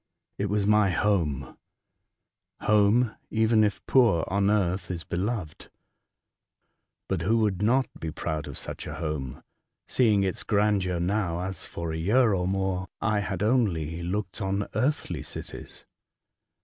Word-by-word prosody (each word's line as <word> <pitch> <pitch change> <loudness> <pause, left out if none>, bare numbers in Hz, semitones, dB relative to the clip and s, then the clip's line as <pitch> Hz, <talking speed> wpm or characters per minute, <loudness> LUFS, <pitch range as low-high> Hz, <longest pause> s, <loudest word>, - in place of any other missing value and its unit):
It 100 - 0
was 100 0 0
my 105 -1 +4
home! 90 -7 0 1.0
Home, 105 +3 +3
even 110 0 +3
if 105 - -1
poor, 115 -11 +4
on 100 +1 +2
earth 95 -3 0
is 85 -3 -4
beloved; 95 -3 -4 1.4
but - - -1
who 110 +3 +2
would 105 -4 +1
not 125 +5 +3
be 80 - -4
proud 80 -1 -3
of - - -7
such - - -6
a - - -5
home, 70 -5 -4 0.4
seeing 110 -6 +3
its 95 -2 -1
grandeur 100 -4 +1
now, 90 -1 0
as, 95 -2 -4
for 85 -1 -5
a 80 - -3
year 110 +7 +3
or 90 -1 0
more, 95 -1 -1
I 105 0 +1
had 100 -1 -2
only 85 - +1
looked 95 +3 -3
on 100 +1 -1
earthly 145 +4 -1
cities - - -8
100 Hz, 140 wpm, -27 LUFS, 85-105 Hz, 1.4 s, my